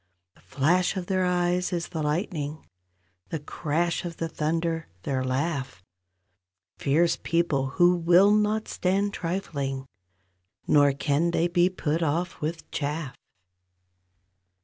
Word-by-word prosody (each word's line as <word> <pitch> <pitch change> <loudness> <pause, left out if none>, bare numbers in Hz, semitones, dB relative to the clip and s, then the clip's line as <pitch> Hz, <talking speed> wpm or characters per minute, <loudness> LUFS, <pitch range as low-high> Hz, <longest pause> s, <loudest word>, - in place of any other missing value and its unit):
The - - -24
flash 175 +8 +1
of 180 - -3
their 185 0 +1
eyes 180 0 +1
is 170 -1 -2
the 160 - -4
lightning; 155 -1 -2 0.6
The 165 - -2
crash 160 +4 -1
of 170 -2 -6
the 165 - -2
thunder, 165 +1 -1 0.2
their 130 -2 -1
laugh; 130 - -2 1.0
Fierce 160 +5 +2
people 165 -6 +1
who 175 0 +6
will 175 +4 +5
not 210 +1 +2
stand 200 +2 0
trifling, 145 -8 -3 0.8
Nor 145 -2 +5
can 145 +4 +1
they 170 0 +1
be 175 +1 +3
put 165 -3 -2
off 170 +3 -1
with 160 +2 -4
chaff. 145 -2 -3
165 Hz, 125 wpm, -26 LUFS, 145-180 Hz, 1.0 s, who